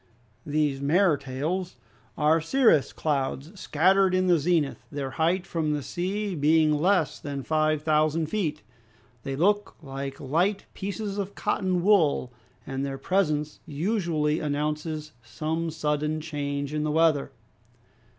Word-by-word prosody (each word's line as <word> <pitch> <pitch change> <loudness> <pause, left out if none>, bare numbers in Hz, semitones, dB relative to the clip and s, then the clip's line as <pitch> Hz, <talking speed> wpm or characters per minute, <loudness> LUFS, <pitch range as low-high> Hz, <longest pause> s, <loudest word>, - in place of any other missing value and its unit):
These 145 -2 0
mares 160 +1 +3
tails 155 +8 -3 0.4
are 155 +2 +3
cirrus 220 - +3
clouds, 140 0 -2
scattered 185 +4 +3
in 185 0 +2
the 175 -3 +4
zenith, 160 -2 +1
their 140 -2 -4
height 170 +6 +1
from 160 -5 -1
the 145 -2 -2
sea 195 +5 -2
being 155 0 +3
less 170 +1 +2
than 140 -2 -5
five 155 0 +1
thousand 155 +1 +2
feet. 155 - -2 0.6
They 135 +2 -4
look 205 +6 +1
like 135 -2 -6
light 175 +9 0
pieces 200 +1 -4
of 200 0 -4
cotton 185 -2 0
wool, 160 -11 +3 0.3
and 135 0 -3
their 135 -1 -3
presence 150 -1 0
usually 160 -2 0
announces 150 +1 -2
some 155 +9 -3
sudden 150 0 -1
change 145 -2 -3
in 150 0 -1
the 155 - -1
weather. 155 -3 +3
155 Hz, 130 wpm, -26 LUFS, 145-180 Hz, 0.6 s, the